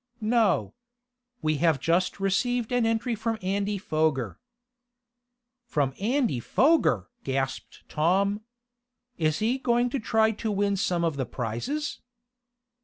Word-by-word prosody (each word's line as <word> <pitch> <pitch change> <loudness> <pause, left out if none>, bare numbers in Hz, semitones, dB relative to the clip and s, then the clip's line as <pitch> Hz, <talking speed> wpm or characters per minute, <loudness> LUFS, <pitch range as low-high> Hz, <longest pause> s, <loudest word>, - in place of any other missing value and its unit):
"No. 225 0 +2 0.7
We 155 -1 +1
have 160 -2 +2
just 170 +7 +1
received 230 +5 0
an 245 -2 +2
entry 225 +2 0
from 225 +1 -2
Andy 200 +2 -1
Foger." 155 - -1 1.3
"From 140 - 0
Andy 235 - +1
Foger!" 130 - +2
gasped 135 0 -3
Tom. 195 +6 +1 0.8
"Is 155 -1 +1
he 235 +5 0
going 240 -1 +1
to 275 - -1
try 220 0 +2
to 220 0 -3
win 200 0 +1
some 180 -3 0
of 160 -4 0
the 130 - -2
prizes?" 275 - -3
200 Hz, 120 wpm, -27 LUFS, 155-230 Hz, 1.3 s, No